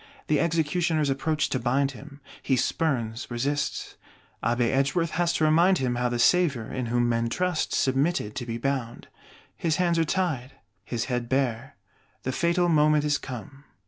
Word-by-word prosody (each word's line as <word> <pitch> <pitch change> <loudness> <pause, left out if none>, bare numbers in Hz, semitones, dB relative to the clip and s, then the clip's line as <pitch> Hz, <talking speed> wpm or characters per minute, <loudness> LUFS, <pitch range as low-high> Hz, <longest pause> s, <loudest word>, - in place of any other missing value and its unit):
The 150 - +2
Executioners 165 -2 +1
approach 150 +3 0
to 130 - -1
bind 135 +3 +1
him: 140 +2 -12 0.2
he 135 - +1
spurns, 125 -5 -1
resists; 140 +4 -2 0.5
Abbé 120 +1 +1
Edgeworth 145 +5 +1
has 175 0 +1
to - - 0
remind 170 +5 +4
him 130 -3 0
how 125 0 0
the 120 - -2
Savior, 140 -3 +2
in 125 -2 -2
whom 120 +1 +1
men 115 0 0
trust, 180 +3 -1
submitted 135 -4 +1
to 120 - -4
be 115 0 -3
bound. 125 -2 -3 0.5
His 160 -2 0
hands 175 -2 +1
are - - +4
tied, 155 -7 -1 0.3
his 115 +2 -3
head 120 -2 -3
bare; 130 -1 -1 0.5
the 130 - -1
fatal 170 +5 +1
moment 150 -2 +4
is 145 -1 +1
come. 135 +3 -9
140 Hz, 165 wpm, -26 LUFS, 120-160 Hz, 0.5 s, remind